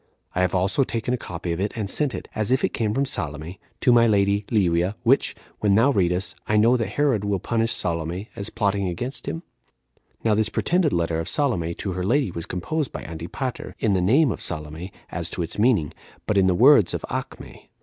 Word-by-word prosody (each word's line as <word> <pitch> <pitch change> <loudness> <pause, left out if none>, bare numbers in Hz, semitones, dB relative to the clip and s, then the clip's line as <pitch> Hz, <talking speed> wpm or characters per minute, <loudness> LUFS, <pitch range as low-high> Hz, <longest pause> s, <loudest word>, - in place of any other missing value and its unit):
I 90 - 0
have 90 0 +1
also 95 +10 +2
taken 120 -1 -2
a - - +3
copy 90 -7 -5 0.2
and 110 -3 -2
sent 140 +5 0
it, - - -7
as 110 0 -2
if 130 +1 +2
it - - 0
came 110 -2 0
from 135 +6 +1
Salome, 80 - -4 0.2
to 125 - +4
my 115 -1 +6
lady 100 -1 +2
[Livia]; 90 -2 +2
which, - - +3 0.2
when 100 -2 +3
thou 120 +7 +5
readest, 90 -3 +1
I 105 - +2
know 115 +4 +5
that 115 -3 -2
Herod 135 -8 +2
Will 100 -1 0
punish 115 +4 0
Salome, 85 +4 -2
as 100 +1 -3
plotting 100 -2 0
against 120 +10 -4
him?' 165 - -4 0.8
Now 110 - +3
this 110 0 +1
pretended 175 +2 +1
letter 85 -1 0
of 80 +1 -4
Salome 85 - 0
to 100 - -4
her 90 0 -3
lady 120 +1 +1
was 85 0 -6
composed 145 - -2
by - - -6
Antipater, 85 - -5
in 105 - +1
the 95 - +2
name 130 - +4
of - - -5
Salome, 80 +3 -5 0.2
as - - -3
to - - -1
its 85 - -5
meaning, 105 - +2 0.3
but 105 - 0
in 95 -1 +4
the 90 - +3
words 120 - +6
of - - -4
Acme. - - -7
100 Hz, 210 wpm, -24 LUFS, 90-120 Hz, 0.8 s, my